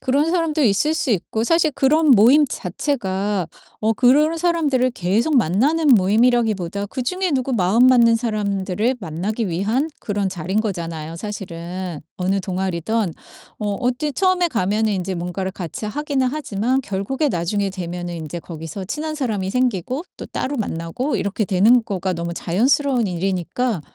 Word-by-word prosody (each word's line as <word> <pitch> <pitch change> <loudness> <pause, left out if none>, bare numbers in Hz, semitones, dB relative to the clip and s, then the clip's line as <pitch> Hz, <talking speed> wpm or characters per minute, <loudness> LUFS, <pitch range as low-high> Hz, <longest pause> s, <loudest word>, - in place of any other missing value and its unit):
그런 285 +5 +1
사람도 330 -3 +1
있을 235 +7 +3
수 295 - -1
있고 220 +2 -1
사실 325 +5 +3
그런 300 +3 +3
모임 255 +6 +7
자체가 195 - -2 0.3
어 220 +1 +2
그런 290 +8 +4
사람들을 310 -7 +1
계속 225 - +1
만나는 255 - +2
모임이라기보다 210 -2 +2
그중에 345 - -2
누구 265 -2 0
마음 215 +5 +4
맞는 235 -3 +6
사람들을 210 0 -1
만나기 195 +6 -3
위한 215 - 0
그런 205 -3 -1
자리인 185 +3 -1
거잖아요 165 -6 -4
사실은. 180 -3 -6 0.2
어느 190 +2 0
동아리든. 185 +1 -1 0.5
어 210 -1 -2
어찌 255 +4 -1
처음에 370 +1 +2
가면은 215 - 0
이제 190 -1 -2
뭔가를 180 +2 -3
같이 185 +2 -6
하긴 280 +4 -1
하지만 255 -2 0
결국에 245 +9 -1
나중에 195 0 -1
되면은 175 -1 -5
인제 160 +1 -6
거기서 165 +3 -7
친한 310 +9 -4
사람이 220 -10 -2
생기고 250 - -1
또 - - -7
따로 280 +2 -3
만나고 200 - -2
이렇게 200 +2 -1
되는 220 +6 +4
거가 190 -2 -2
너무 170 0 -4
자연스러운 245 - +1
일이니까 190 +4 -1
215 Hz, 355 characters per minute, -21 LUFS, 185-260 Hz, 0.5 s, 모임